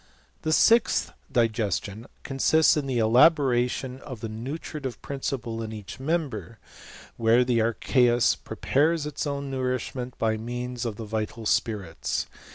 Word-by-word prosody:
The 155 Hz, -, -1 dB
sixth 230 Hz, +8 st, +4 dB, 0.2 s
digestion 110 Hz, -2 st, -1 dB, 0.2 s
nsists 145 Hz, +4 st, +3 dB
in 145 Hz, -3 st, -1 dB
the 130 Hz, -2 st, -1 dB
elaboration 125 Hz, +1 st, +3 dB
of 130 Hz, -5 st, -9 dB
the 115 Hz, -, -4 dB
nutritive 135 Hz, +3 st, -6 dB
principle 125 Hz, -5 st, -4 dB
each 105 Hz, 0 st, -8 dB
member, 130 Hz, -, -2 dB, 0.6 s
where 115 Hz, +2 st, +4 dB
the 120 Hz, -2 st, +2 dB
archeus 120 Hz, +1 st, +3 dB
prepares 155 Hz, +2 st, 0 dB
its 150 Hz, 0 st, -3 dB
own 140 Hz, -1 st, -3 dB
ittrishment 125 Hz, -1 st, -3 dB
by 110 Hz, -1 st, +1 dB
means 120 Hz, +2 st, -4 dB
of 115 Hz, -3 st, -3 dB
the 110 Hz, -, -7 dB
vital 110 Hz, +1 st, -4 dB
spirits. 105 Hz, -8 st, -1 dB
125 Hz, 125 wpm, -26 LUFS, 110-135 Hz, 0.6 s, sixth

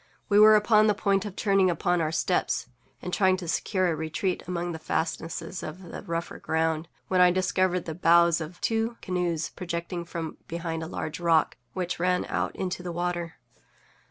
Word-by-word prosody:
We 205 Hz, 0 st, +5 dB
were 215 Hz, 0 st, +9 dB
upon 215 Hz, 0 st, +5 dB
the 210 Hz, -, +3 dB
point 200 Hz, 0 st, +1 dB
of 200 Hz, -3 st, -6 dB
turning 195 Hz, -3 st, +3 dB
upon 175 Hz, +1 st, +1 dB
our 155 Hz, -1 st, 0 dB
steps, 165 Hz, -6 st, 0 dB, 0.4 s
and 180 Hz, -1 st, -5 dB
trying 185 Hz, -2 st, +3 dB
to 180 Hz, -2 st, -7 dB
secure 185 Hz, +3 st, 0 dB
a -, -, -1 dB
retreat 160 Hz, +4 st, -2 dB
among 175 Hz, -1 st, -2 dB
the 160 Hz, -, -6 dB
fastnesses 165 Hz, +3 st, -3 dB
of 155 Hz, +4 st, -7 dB
the -, -, -6 dB
rougher 170 Hz, -2 st, -4 dB
ground, 160 Hz, 0 st, 0 dB, 0.2 s
when 185 Hz, -1 st, +3 dB
I 180 Hz, -, +7 dB
discovered 185 Hz, 0 st, +1 dB
the 160 Hz, -, -4 dB
bows 170 Hz, 0 st, +4 dB
of 160 Hz, +3 st, -7 dB
two 225 Hz, +1 st, 0 dB
canoes 175 Hz, -3 st, -1 dB
projecting 170 Hz, 0 st, -4 dB
from 165 Hz, -2 st, -5 dB
behind 165 Hz, -1 st, -4 dB
a 160 Hz, -, -4 dB
large 160 Hz, -1 st, -5 dB
rock 165 Hz, -2 st, +3 dB, 0.2 s
which 180 Hz, -2 st, -3 dB
ran 180 Hz, +1 st, +1 dB
out -, -, -1 dB
into 180 Hz, -1 st, -3 dB
the 180 Hz, -1 st, -5 dB
water. 175 Hz, -1 st, -3 dB
175 Hz, 185 wpm, -27 LUFS, 165-185 Hz, 0.4 s, were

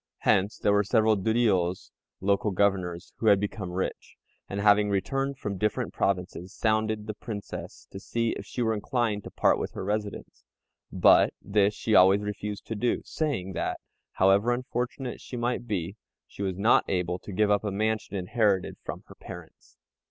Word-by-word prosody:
Hence 100 Hz, +3 st, +2 dB
there 100 Hz, -, +2 dB
were 105 Hz, 0 st, +4 dB
several 110 Hz, +1 st, +3 dB
Duriôs 100 Hz, -4 st, +1 dB, 0.3 s
(local 100 Hz, +2 st, +1 dB
governors) 95 Hz, -3 st, 0 dB
who 110 Hz, -, -1 dB
had 100 Hz, -2 st, +6 dB
become 100 Hz, -2 st, -4 dB
rich, 90 Hz, +1 st, -4 dB, 0.3 s
and 100 Hz, -, -3 dB
having 105 Hz, 0 st, +4 dB
returned 135 Hz, +7 st, -1 dB
from 100 Hz, -7 st, -4 dB
different 105 Hz, 0 st, -1 dB
provinces, 90 Hz, -1 st, -2 dB
sounded 110 Hz, -1 st, 0 dB
the 110 Hz, -, -4 dB
Princess 105 Hz, -1 st, -7 dB
to 95 Hz, -, -7 dB
see 115 Hz, +3 st, -1 dB
if -, -, -5 dB
she 125 Hz, -, -3 dB
were 110 Hz, -1 st, +1 dB
inclined 110 Hz, -1 st, -1 dB
to -, -, -6 dB
part -, -, +2 dB
with -, -, -4 dB
her -, -, -5 dB
residence; 105 Hz, +1 st, -4 dB, 0.5 s
but -, -, +5 dB
this 100 Hz, +1 st, +1 dB
she 110 Hz, -, -1 dB
always 95 Hz, +1 st, +6 dB
refused 105 Hz, 0 st, -5 dB
to 110 Hz, -, -4 dB
do, 120 Hz, +3 st, 0 dB
saying 120 Hz, -, -2 dB
that, -, -, -2 dB, 0.3 s
however 100 Hz, +5 st, +4 dB
unfortunate 125 Hz, 0 st, -3 dB
she 125 Hz, -, -7 dB
might 120 Hz, 0 st, -2 dB
be, 95 Hz, -1 st, -3 dB, 0.3 s
she -, -, -11 dB
was 95 Hz, -2 st, -2 dB
not 110 Hz, +4 st, +4 dB
able 90 Hz, -1 st, -1 dB
to -, -, -10 dB
give 105 Hz, +2 st, +2 dB
up 100 Hz, 0 st, +2 dB
a 105 Hz, -, -1 dB
mansion 110 Hz, +1 st, -1 dB
inherited 100 Hz, 0 st, 0 dB
from -, -, -6 dB
her -, -, -13 dB
parents. -, -, -12 dB
105 Hz, 175 wpm, -27 LUFS, 95-110 Hz, 0.5 s, had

